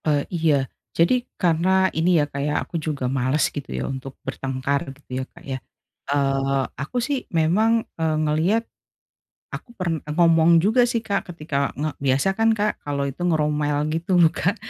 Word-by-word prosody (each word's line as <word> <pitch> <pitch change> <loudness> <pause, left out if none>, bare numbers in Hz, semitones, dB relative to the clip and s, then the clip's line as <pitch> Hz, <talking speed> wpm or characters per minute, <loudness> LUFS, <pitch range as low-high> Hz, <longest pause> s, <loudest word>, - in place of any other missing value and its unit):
Eee, 145 -2 +2
iya. 160 -4 +3 0.4
Jadi 170 +7 +4 0.3
karena 185 +2 +3
ini 170 +2 +3
ya, 145 - +3
Kak, 140 -1 -5
ya, 150 +1 0
aku - - -11
juga 150 -4 -3
males 130 +2 +1
gitu 145 -2 -6
ya, - - -2
untuk 135 0 -6
bertengkar 135 +1 -2 0.2
gitu 130 -2 -5
ya, - - -3
Kak, - - -17
ya. 135 -1 -3 0.5
Eee, 135 -1 +1 0.2
aku 150 - -4
sih 270 +4 0
memang, 215 +8 +2 0.2
eee, 160 -1 +1
ngelihat, 165 +9 +2 0.9
aku - - -7
pern 170 -3 -1
eee, 150 - -4
ngomong 165 -1 +5
juga 230 +5 +4
sih, 235 -2 -1
Kak, 200 -3 -2
ketika 145 -3 -2
nge 155 +3 -1
biasa 135 +5 +2
kan, 225 0 +4
Kak, 210 0 0
kalau 140 -1 -1
itu 135 - -15
ngomel 150 -2 +1
gitu 175 +3 0
loh, 165 - +6
Kak. 180 +4 0
155 Hz, 175 wpm, -23 LUFS, 140-180 Hz, 0.9 s, loh